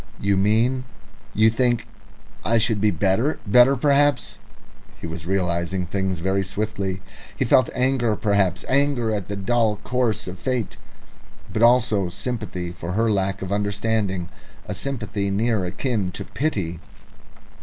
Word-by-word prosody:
"You 100 0 +1
mean 115 +6 +2 0.5
you 110 +1 +5
think 120 0 +1 0.6
I 115 +1 +3
should 110 -2 +1
be 105 - +4
better, 105 +9 +1
better 125 +6 +6
perhaps 145 +2 +2 0.3
" - - -26
He - - -7
was 80 0 -6
realising 90 -1 -1
things 95 -1 -2
very 95 +2 +1
swiftly. 95 -1 -3 0.3
He - - +1
felt 130 -3 +4
anger, 125 -3 +2
indeed, 100 -4 +2
anger 135 -5 +2
at 100 -4 -3
the 105 - -4
dull 110 +2 +1
course 125 -6 0
of 90 0 -7
fate, 125 -5 -2 0.8
but 110 - -1
also 115 -6 +4
sympathy 95 -4 -4
for 85 0 -6
her 115 +2 +2
lack 95 -1 -1
of 95 - -5
understanding 100 -3 -1 0.4
a - - -3
sympathy 105 -5 -2
near 105 0 0
akin 100 +1 -1
to - - -5
pity. 100 - -2
105 Hz, 145 wpm, -23 LUFS, 95-120 Hz, 0.8 s, better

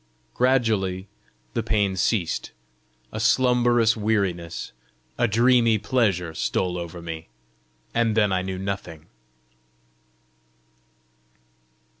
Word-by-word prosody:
Gradually 110 -7 +1 0.5
the - - 0
pain 100 -3 0
ceased. 95 -1 -1 0.6
A 110 - -5
slumberous 120 -1 +3
weariness, 100 -6 -1 0.5
a 120 - +3
dreamy 115 0 +4
pleasure 100 -9 0
stole 90 +2 -1
over 85 -1 -6
me, 80 -1 -6 0.7
and 115 -2 +1
then 105 -3 +3
I 95 -1 +1
knew 95 0 -4
nothing. 95 -5 -5
105 Hz, 90 wpm, -24 LUFS, 90-115 Hz, 0.7 s, dreamy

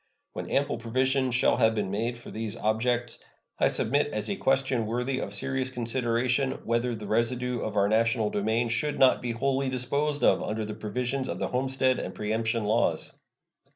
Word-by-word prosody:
When - - -5
ample 140 -4 0
provision 130 +3 +1
shall 125 -1 +3
have 110 -2 +3
been 100 -3 -1
made 115 +4 -1
for 120 - -11
these 110 -2 -4
objects, 120 +2 0 0.4
I - - +4
submit 140 +7 +2
as 105 -6 -2
a - - -1
question 135 -4 +1
worthy 125 +3 -1
of - - -4
serious 130 +6 -1
consideration 125 +1 0
whether 115 +1 0
the 105 -1 -7
residue 120 +3 0
of 105 -1 -4
our 100 0 +4
national 110 0 +2
domain 110 +3 0
should 145 +6 -1
not 130 -1 +5
be 120 -1 -2
wholly 135 +2 0
disposed 140 +4 -1
of - - +4
under 110 0 -2
the 105 - -5
provisions 125 +5 -3
the - - -3
homestead 130 0 +1
and 95 - -5
preemption 110 +1 -1
laws. 110 +3 +1
120 Hz, 175 wpm, -27 LUFS, 110-130 Hz, 0.4 s, not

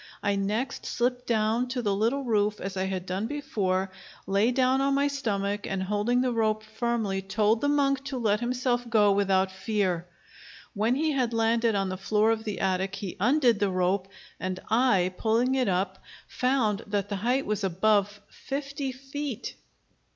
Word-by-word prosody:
I 200 -1 +1
next 215 +7 -2
slipped 245 +1 -1
down 225 +2 +1
to 250 -1 -3
the 205 -2 +1
little 230 +8 0
roof, 210 -3 +1
as 195 0 -5
I 190 0 -1
had 190 -1 -3
done 190 +4 -2
before, 195 -9 -1 0.3
lay 200 +4 +2
down 260 +1 +2
on 275 0 +2
my 280 +1 +2
stomach, 205 -7 -2
and 190 -1 -2
holding 210 +5 +1
the 255 -1 +1
rope 215 -2 0
firmly, 220 -3 -2
told 210 +3 +1
the 285 - +1
monk 275 -2 +2
to 275 -2 -4
let 210 -3 +1
himself 245 0 -1
go 210 -3 +4
without 195 -1 +2
fear. 190 -3 -1 0.7
When 225 +3 +1
he 310 +3 +1
had 255 -4 0
landed 225 0 +2
on 195 -1 0
the 185 - -4
floor 215 +3 +2
of 225 0 -2
the 210 -2 -3
attic 190 +1 0
he 195 -4 -6
undid 245 0 +3
the 205 - +2
rope, 185 +1 0 0.3
and 185 0 -3
I, 205 -7 +3
pulling 235 +3 +2
it 260 -2 +1
up, 190 0 -1 0.3
found 245 -5 0
that 205 -1 -1
the 200 - -2
height 250 +7 0
was 210 -1 -2
above 205 +2 +1
fifty 275 0 -4
feet. 270 -1 -5
215 Hz, 175 wpm, -27 LUFS, 195-250 Hz, 0.7 s, go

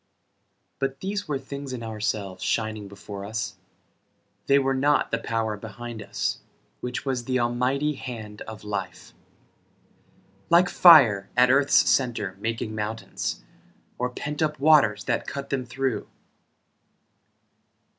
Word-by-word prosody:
But 135 0 -2
these 200 +1 -3
were 145 -2 -1
things 140 0 -7
in 120 -2 -5
ourselves, 105 -4 -3
shining 110 -2 -1
before 100 0 -9
us, 100 -2 -4 0.9
They 140 - +5
were 135 -1 +2
not 145 +2 +2
the - - 0
power 110 -2 -1
behind 110 +2 -8
us, - - -2 0.4
Which 125 +2 -4
was 130 -3 -2
the 130 0 0
Almighty 125 +5 +1
hand 110 -6 -8
of 110 -1 -9
Life, 95 -4 -5 1.4
Like 175 +1 +5
fire 120 - +7
at 125 +1 +6
earth's 140 +1 +4
center 115 -8 +1
making 115 0 -3
mountains, 105 - -4 0.6
Or 125 +1 0
pent 150 +4 -5
up 150 -2 0
waters 135 -9 +5
that - - -1
cut 140 0 -6
them 130 -3 -2
through. 130 -1 -2
120 Hz, 125 wpm, -25 LUFS, 105-135 Hz, 1.4 s, fire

